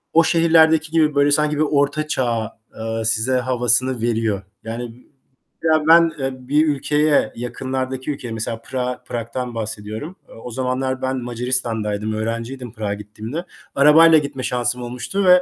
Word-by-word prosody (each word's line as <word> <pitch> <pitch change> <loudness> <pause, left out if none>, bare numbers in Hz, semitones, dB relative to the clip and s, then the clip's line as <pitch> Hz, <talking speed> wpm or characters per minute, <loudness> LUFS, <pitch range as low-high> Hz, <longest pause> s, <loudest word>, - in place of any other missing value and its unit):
O 165 - +7
şehirlerdeki 160 -1 +4
gibi 155 -3 +2
böyle 145 0 +4
sanki 150 0 +2
bir - - +1
Orta 150 0 +1
Çağ, 115 -6 -2 0.2
eee, 115 0 -3
size 115 +4 +2
havasını 125 0 +1
veriyor. 115 -4 0 0.2
Yani 115 +2 -7 0.6
mesela 155 -1 +2
ben, 165 0 +7
eee, 130 -1 -4
bir 155 +2 +3
ülkeye, 150 +1 +1
yakınlardaki 130 +2 -4
ülkeye, 130 -5 -6
mesela 115 +1 -4
Prag'a 125 +1 -4
Prag'dan 120 +1 -5
bahsediyorum. 110 - -5
Eee, - - -14
o 115 +2 -9
zamanlar 130 +1 -2
ben 130 0 -1
Macaristan'daydım, 115 -4 -2
öğrenciydim 115 +2 -4
Prag'a 105 -3 -3
gittiğimde. 110 - -7 0.3
Arabayla 160 +3 +7
gitme 140 -3 -3
şansım 125 0 -1
olmuştu 125 +11 -3
ve 180 0 +7
130 Hz, 145 wpm, -20 LUFS, 115-150 Hz, 0.6 s, O